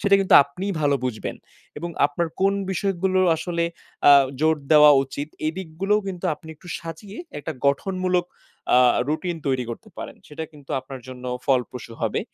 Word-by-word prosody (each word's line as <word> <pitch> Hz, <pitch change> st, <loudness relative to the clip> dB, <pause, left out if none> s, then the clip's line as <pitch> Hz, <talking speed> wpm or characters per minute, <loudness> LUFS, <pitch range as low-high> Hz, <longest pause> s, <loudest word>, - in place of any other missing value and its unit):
সেটা 200 Hz, 0 st, +4 dB
কিন্তু 195 Hz, -, +3 dB
আপনিই 180 Hz, +8 st, -4 dB
ভালো 145 Hz, -1 st, +3 dB
বুঝবেন 120 Hz, -4 st, -3 dB, 0.4 s
এবং 170 Hz, -, -5 dB, 0.2 s
আপনার 165 Hz, +4 st, -2 dB
কোন 195 Hz, +1 st, +4 dB, 0.2 s
বিষয়গুলো 190 Hz, -1 st, 0 dB, 0.2 s
আসলে 170 Hz, +1 st, -1 dB, 0.4 s
আ -, -, +10 dB, 0.3 s
জোর 160 Hz, 0 st, +3 dB, 0.2 s
দেওয়া 150 Hz, -1 st, +9 dB
উচিত 140 Hz, +2 st, -6 dB, 0.2 s
এদিকগুলোও 190 Hz, +4 st, -1 dB
কিন্তু 185 Hz, -1 st, -6 dB
আপনি 160 Hz, +2 st, -16 dB
একটু 175 Hz, +4 st, -15 dB
সাজিয়ে 170 Hz, +6 st, -9 dB, 0.2 s
একটা 155 Hz, +2 st, -5 dB
গঠনমূলক 180 Hz, +5 st, +1 dB, 0.5 s
আ -, -, +7 dB, 0.3 s
রুটিন 170 Hz, +3 st, -1 dB
তৈরি 130 Hz, -2 st, +1 dB
করতে 115 Hz, -, -8 dB
পারেন। -, -, -7 dB
সেটা 155 Hz, +2 st, -5 dB
কিন্তু 145 Hz, -2 st, -15 dB
আপনার 135 Hz, 0 st, -9 dB
জন্য 125 Hz, -1 st, -9 dB, 0.2 s
ফলপ্রসু 125 Hz, -3 st, -1 dB
হবে। -, -, 0 dB
160 Hz, 155 wpm, -23 LUFS, 140-185 Hz, 0.5 s, আ